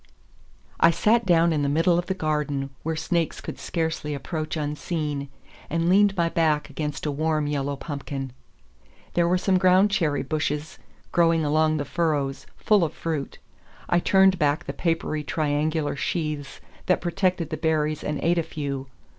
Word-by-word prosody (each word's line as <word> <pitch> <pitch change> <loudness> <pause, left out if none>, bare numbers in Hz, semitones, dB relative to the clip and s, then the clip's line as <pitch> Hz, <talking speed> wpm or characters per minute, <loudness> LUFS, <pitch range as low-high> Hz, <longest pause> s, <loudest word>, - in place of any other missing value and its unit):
I 170 - +7
sat 215 +7 +2
down 170 -1 +4
in 150 - 0
the 140 - +1
middle 165 +4 +3
of 175 - -4
the 190 - -1
garden, 150 -5 -1
where 160 +1 -2
snakes 165 0 -1
could - - -7
scarcely 160 -3 -2
approach 155 +3 -4
unseen, 150 -1 -3 0.4
and 165 +1 0
leaned 200 +1 +4
my 170 -1 +3
back 155 -3 +1
against 150 0 -4
a 150 - 0
warm 155 +1 0
yellow 145 -1 -1
pumpkin. 140 -2 -5 0.8
There 170 -1 +2
were 180 +1 +3
some 185 0 +2
ground 185 +2 +5
cherry 160 -8 +1
bushes 150 +1 -3 0.3
growing 165 -2 +3
along 155 +1 +2
the 145 - -2
furrows, 140 -5 -1
full 210 -4 +3
of 160 - -1
fruit. 155 -4 -4 0.5
I 175 - +4
turned 190 0 +4
back 150 -1 +1
the - - -4
papery 165 -3 -1
triangular 150 0 0
sheaths 150 -3 -3 0.3
that 185 - +3
protected 180 -2 -1
the 155 - -2
berries 155 -2 0
and 150 -1 -2
ate 170 +1 +3
a - - +3
few. 140 -4 -5
155 Hz, 165 wpm, -25 LUFS, 145-170 Hz, 0.8 s, I